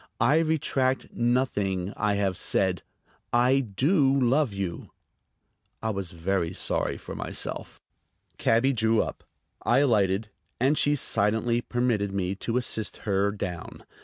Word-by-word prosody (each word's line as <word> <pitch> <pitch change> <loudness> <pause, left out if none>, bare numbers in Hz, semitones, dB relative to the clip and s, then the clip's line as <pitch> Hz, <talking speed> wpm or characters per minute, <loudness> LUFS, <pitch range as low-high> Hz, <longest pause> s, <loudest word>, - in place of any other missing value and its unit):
I 150 +3 +4
retract 140 -5 0
nothing 105 -6 0
I 105 -2 0
have 100 -2 0
said. - - 0 0.5
I 125 +3 +4
do 135 - +2
love 130 +1 +2
you." 95 -4 -5 0.9
I 110 - 0
was 100 -4 -4
very 85 0 -1
sorry - - -1
for - - -9
myself. - - -4 0.6
Cabby 125 +4 +3
drew 110 -1 +2
up. - - -7 0.4
I 120 - +2
alighted, 105 -6 +2 0.3
and 135 +5 +3
she 145 0 +2
silently 115 -1 +1
permitted 120 -5 0
me 95 -1 -1
to 115 +4 -2
assist 110 -4 -1
her 100 -1 +2
down. 90 -4 -6
110 Hz, 130 wpm, -26 LUFS, 100-130 Hz, 0.9 s, I